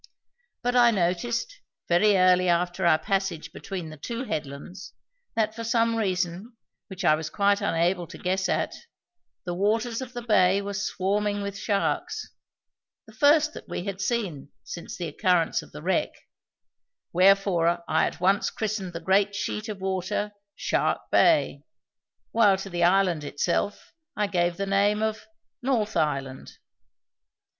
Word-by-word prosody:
But 245 0 0
I 240 -1 +7
noticed, 230 - -1 0.3
very 195 +4 +4
early 185 0 +4
after 175 +1 +1
our 155 -2 +5
passage 195 -3 -2
between 180 -5 -6
the 155 - -10
two 235 - -5
headlands, 150 - -6 0.4
that, 220 -1 +1
for 230 +1 -6
some 230 0 +2
reason 190 +1 -2 0.3
which 190 -2 -6
I 155 - +6
was 155 0 -2
quite 200 0 +2
unable 175 +1 0
to - - -10
guess 190 +1 -1
at, - - 0 0.7
the 175 - -2
waters 225 +6 0
of 255 -1 -7
the 240 -1 -5
bay 195 -4 +4
were 200 0 -4
swarming 205 +1 -1
with 200 -1 -4
sharks 200 0 -2 0.7
the - - -16
first 305 +1 +4
that - - -11
we - - -4
had 195 -1 -5
seen 190 - -2
since 170 - -8
the 175 - -3
occurrence 170 +2 +1
of - - -15
the - - -10
wreck - - +1 1.0
wherefore 180 -2 +3
I 160 +1 +2
at - - -7
once 195 +3 +2
christened 210 -4 -3
the 165 - -6
great 195 +3 +2
sheet 210 +1 -3
of 200 -3 -6
water 190 +2 -2 0.2
"Shark - - -1
Bay", - - +3 0.7
while 205 -4 +4
to 195 0 -7
the 175 0 0
island 180 -3 +3
itself 170 +7 -2 0.2
I 210 - +2
gave 175 -3 0
the 200 - -2
name 200 +2 +2
of 220 0 -3 0.3
"North 235 -5 0
Island." 140 -4 -2
195 Hz, 150 wpm, -26 LUFS, 175-210 Hz, 1.0 s, I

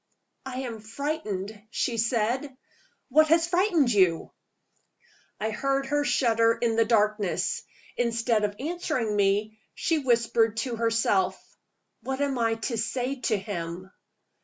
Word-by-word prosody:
"I 260 0 -4
am 235 -4 -5
frightened," 215 -4 -4
she 230 0 -1
said. 240 +4 0 0.5
"What 310 +4 +5
has 330 +1 +4
frightened 345 - +2
you?" 185 -5 +2 1.1
I 220 +1 -1
heard 275 +4 0
her 290 +1 0
shudder 230 -5 +2
in 230 -1 +1
the 225 0 +3
darkness. 215 - +1 0.4
Instead 230 -2 +1
of 205 -1 -1
answering 285 -8 -2
me, 205 +2 +1 0.2
she 325 -2 0
whispered 230 -4 +2
to 235 0 -2
herself: 215 -5 +1 0.6
"What 265 +3 -4
am 280 -3 0
I 225 -1 +2
to 225 +1 -3
say 250 +4 -2
to 215 - +2
him?" 185 -1 -6
230 Hz, 130 wpm, -27 LUFS, 215-270 Hz, 1.1 s, What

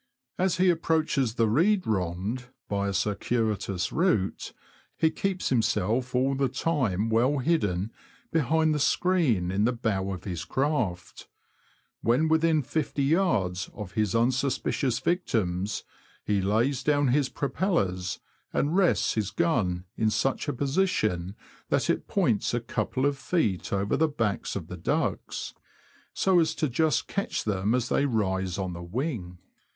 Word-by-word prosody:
As 185 -2 +2
he 185 0 +5
approaches 160 -7 0
the 115 -2 +3
reed 180 - +3
rond, 100 +4 -2 0.2
by 100 0 -1
a 100 - -1
circuitous 100 -1 -1
route, 165 - 0 0.5
he 160 - +3
keeps 190 -2 -2
himself 120 +1 +1
all 130 +2 +2
the 135 -1 +1
time 125 - 0
well 125 +6 +2
hidden 110 - 0 0.4
behind 160 +1 +2
the 150 - 0
screen 145 - +2
in 100 +3 +1
the 120 - +3
bow 110 -5 -1
of 95 - -6
his 90 -4 -4
craft. 110 - -2 0.7
When 125 +8 +2
within 160 -1 +3
50yds. 140 - 0
of 105 -4 -7
his 105 -1 0
unsuspicious 130 +1 +1
victims, 105 - -1 0.4
he 100 -2 +1
lays 115 +8 +1
down 145 -1 +2
his 135 +1 +2
propellers, 120 - -1 0.3
and 150 +4 0
rests 190 -3 +3
his 105 -3 -1
gun 105 - 0
in 110 - +2
such 115 +8 0
a 145 - 0
position 120 - 0 0.3
that - - +2
it - - -3
points - - +1
a - - +1
couple 130 - -2
of 140 -1 0
feet 130 - 0
over 100 +1 0
the 160 +2 +3
backs 115 -9 -2
of 95 -5 -4
the 90 - -8
ducks, 85 - -2 0.6
so 190 -2 +3
as 160 - +1
to 155 - 0
just 150 +1 +1
catch 200 - -2
them 105 +2 0
as 125 -1 -1
they 145 - +2
rise 95 -6 -1
on 95 -2 -3
the 85 - -7
wing. 95 - -4
120 Hz, 145 wpm, -27 LUFS, 100-150 Hz, 0.7 s, he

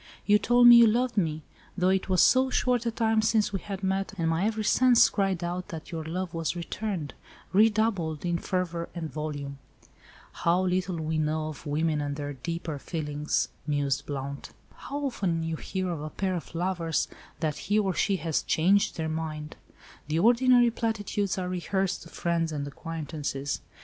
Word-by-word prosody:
You 210 0 +5
told 245 +3 +4
me 240 0 +11
you 235 -1 +8
loved 245 +3 +1
me—though 175 +1 -2
it 190 0 +1
was 185 -1 +5
so 260 +1 +4
short 250 -2 +1
a - - +3
time 225 -1 +2
since 215 -1 +2
we 195 - -1
had 195 +1 -7
met, 195 +1 -1
and 165 -2 +1
my 165 +4 +1
every 220 0 -1
sense 250 +2 +5
cried 195 -4 0
out 175 +1 -3
that 160 -2 -8
your 165 -2 -4
love 175 +2 -4
was 165 +1 -2
returned—redoubled 195 0 -1
in 170 -1 0
fervour 170 -2 -2
and 160 -3 -5
volume." 145 -2 -5 0.7
"How 175 +2 +1
little 185 0 0
we 160 -1 -2
know 155 0 -1
of 155 +1 -9
women 155 +1 0
and 145 -1 -3
their 145 0 -4
deeper 160 +2 -5
feelings," 150 -1 -2 0.2
mused 145 -2 0
Blount. 140 0 -5 0.2
"How 285 +1 -5
often 180 -10 -1
you 165 0 -2
hear 185 +3 -3
of 160 -4 -4
a 155 - -5
pair 190 +4 -2
of 170 -1 -6
lovers, 170 -2 0 0.3
that 155 -3 -1
he 205 - +3
or 195 -3 +1
she 200 +3 +1
has 165 -4 -1
'changed 195 +6 +2
their 160 -1 -2
mind.' 155 -1 -4 0.5
The 155 +1 -1
ordinary 240 +4 +5
platitudes 210 -4 -1
are 185 -1 -2
rehearsed 185 +1 -1
to 165 - -12
friends 165 -2 -1
and 145 -2 -3
acquaintances. 145 -2 -4
175 Hz, 175 wpm, -27 LUFS, 155-205 Hz, 0.7 s, me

